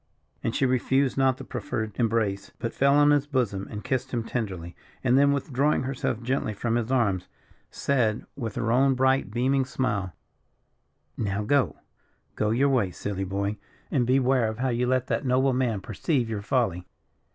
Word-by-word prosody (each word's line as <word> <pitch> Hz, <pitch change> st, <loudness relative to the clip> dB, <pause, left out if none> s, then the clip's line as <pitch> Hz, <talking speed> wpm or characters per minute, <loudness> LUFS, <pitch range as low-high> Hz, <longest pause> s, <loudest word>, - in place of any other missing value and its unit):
And 115 Hz, -, -1 dB
she 135 Hz, -, +2 dB
refused 130 Hz, +1 st, +2 dB
not 130 Hz, -1 st, +2 dB
the -, -, -8 dB
proffered 110 Hz, -3 st, -4 dB
embrace, 110 Hz, -4 st, 0 dB
but 115 Hz, -2 st, -4 dB
fell 140 Hz, +1 st, +3 dB
on 145 Hz, 0 st, +6 dB
his 145 Hz, -1 st, +2 dB
bosom 115 Hz, -9 st, -1 dB
and 105 Hz, -1 st, -6 dB
kissed 130 Hz, -2 st, -2 dB
him 120 Hz, -2 st, -1 dB
tenderly; 95 Hz, -8 st, -4 dB, 0.3 s
and 125 Hz, -1 st, +3 dB
then 140 Hz, +1 st, +5 dB
withdrawing 140 Hz, 0 st, +1 dB
herself 130 Hz, -3 st, -2 dB
gently 120 Hz, -4 st, -1 dB
from 115 Hz, +3 st, -1 dB
his 120 Hz, +1 st, -1 dB
arms, 100 Hz, -8 st, +1 dB, 0.4 s
said, 120 Hz, -6 st, 0 dB
with 115 Hz, -6 st, -5 dB
her 115 Hz, -, 0 dB
own 135 Hz, +2 st, +4 dB
bright, 130 Hz, 0 st, +2 dB
beaming 130 Hz, +5 st, +1 dB
smile: 105 Hz, -8 st, -2 dB, 1.0 s
"Now 100 Hz, -1 st, -1 dB
go 140 Hz, +4 st, +2 dB, 0.6 s
go 105 Hz, -, 0 dB
your 130 Hz, +6 st, +3 dB
way, 120 Hz, -8 st, +2 dB
silly 95 Hz, +2 st, -4 dB
boy 100 Hz, +2 st, -2 dB, 0.3 s
and 125 Hz, -5 st, +1 dB
beware 130 Hz, -3 st, +3 dB
how 130 Hz, +3 st, -1 dB
you 125 Hz, +1 st, 0 dB
let 130 Hz, 0 st, +1 dB
that -, -, -1 dB
noble 130 Hz, +1 st, +2 dB
man 120 Hz, -6 st, 0 dB
perceive 120 Hz, -, -1 dB
your 105 Hz, -2 st, -3 dB
folly." 100 Hz, -7 st, 0 dB
125 Hz, 170 wpm, -26 LUFS, 105-130 Hz, 1.0 s, on